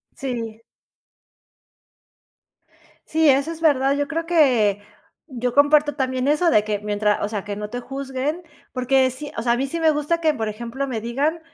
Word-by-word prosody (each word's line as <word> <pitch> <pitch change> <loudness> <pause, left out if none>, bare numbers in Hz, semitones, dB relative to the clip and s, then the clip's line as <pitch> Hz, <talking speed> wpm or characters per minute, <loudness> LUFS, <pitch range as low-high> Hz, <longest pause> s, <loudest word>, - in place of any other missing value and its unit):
Sí. 230 -4 -5 2.5
Sí, 320 -1 +3
eso 275 +4 +3
es 325 - -12
verdad. 275 -3 +3
Yo 285 0 0
creo 330 +1 -2
que 245 - +3 0.5
yo 250 -2 -3
comparto 295 +1 +4
también 260 -1 -1
eso 305 +4 +3
de 210 0 +3
que 210 -1 -1
mientras 210 0 0
o 205 - -1
sea, 210 -2 -4
que 205 -1 -4
no 210 0 -6
te 245 - -4
juzguen, 270 +5 -4 0.3
porque 260 +1 +2
sí, 290 +3 -8
o - - -1
sea, 235 0 +2
a - - 0
mí 270 - 0
sí 335 +5 -4
me 320 -1 +4
gusta 300 +3 0
que, 315 -2 +2
por 220 -5 -3
ejemplo, 235 +5 -5
me 225 -3 -2
digan, 280 +9 -1
265 Hz, 180 wpm, -22 LUFS, 230-300 Hz, 2.5 s, comparto